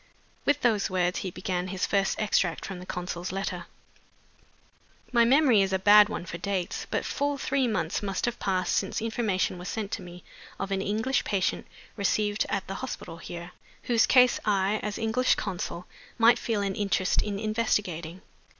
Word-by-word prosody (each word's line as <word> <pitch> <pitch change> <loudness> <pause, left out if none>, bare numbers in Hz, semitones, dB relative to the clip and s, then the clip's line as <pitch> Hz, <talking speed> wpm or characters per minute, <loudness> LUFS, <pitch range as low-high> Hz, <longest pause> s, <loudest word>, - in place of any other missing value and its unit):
With 290 0 +2
those 220 -5 +2
words 180 -1 0
he 190 - -3
began 180 0 -3
his 185 0 -1
first 195 -1 0
extract 185 -6 +1
from 195 -2 -6
the 180 - -10
consul's 180 0 -4
letter. 195 +1 -4 1.4
"'My 235 -1 +5
memory 260 -4 +5
is 195 -1 +1
a 190 - +2
bad 205 +2 +7
one 180 - -4
for 170 0 -6
dates. 190 -1 -3
But - - -1
full 285 0 -1
three 270 -1 0
months 175 -7 -1
must 195 -2 -2
have 240 - -3
passed 185 -2 0
since - - -1
information 215 -5 -1
was 180 - -6
sent 210 -3 -4
to - - -3
me 175 0 -11 0.4
of 195 0 -3
an 195 -1 0
English 220 +7 0
patient, 195 -3 -1 0.3
received 205 +1 +1
at 195 -1 -1
the 195 - -6
hospital 250 -9 -6
here, 170 +1 -8 0.3
whose 235 -1 +3
case 250 -1 +5
I, 200 0 +1
as 210 -1 -3
English 230 +3 +2
consul, 180 -2 -4 0.3
might 230 0 +5
feel 220 -3 -1
an 195 -1 -1
interest 195 -2 +1
in 205 -2 -3
investigating. 200 -6 -1
200 Hz, 175 wpm, -27 LUFS, 185-220 Hz, 1.4 s, bad